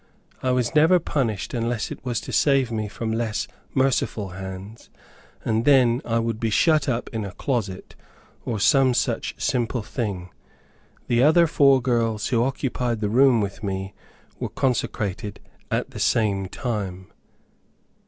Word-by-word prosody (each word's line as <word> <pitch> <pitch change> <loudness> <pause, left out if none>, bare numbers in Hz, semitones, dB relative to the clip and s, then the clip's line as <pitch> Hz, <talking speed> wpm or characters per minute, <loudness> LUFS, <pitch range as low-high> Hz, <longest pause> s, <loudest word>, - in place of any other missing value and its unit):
I 130 - 0
was 125 0 +1
never 160 +4 +6
punished 130 - -2
unless 115 -2 -2
it - - -8
was 120 -4 -1
to - - -8
save 135 -4 +3
me 110 -2 -2
from 110 +2 -4
less 115 -1 -1 0.3
merciful 130 -6 +1
hands; 95 +3 -8 0.6
and 110 +1 +1
then 125 -3 +4
I 115 0 0
would 115 -1 -1
be 115 - 0
shut 150 +5 +3
up 120 -1 -1
in 110 -1 -2
a 100 -2 -6
closet, 110 -8 -3 0.5
or 110 -3 -3
some 130 +3 +4
such - - -1
simple 120 -1 -1
thing. 100 -7 -4 0.7
The 120 0 +2
other 160 +5 +6
four 140 -4 +4
girls 115 -4 0
who 115 -2 +2
occupied 125 -3 -1
the 105 -1 -1
room 125 0 +5
with 100 -1 -4
me, 95 -1 -4 0.5
were - - -3
consecrated 105 -5 -2 0.3
at - - -1
the - - -8
same 100 -4 +1
time. 95 -5 -4
115 Hz, 150 wpm, -24 LUFS, 105-130 Hz, 0.7 s, never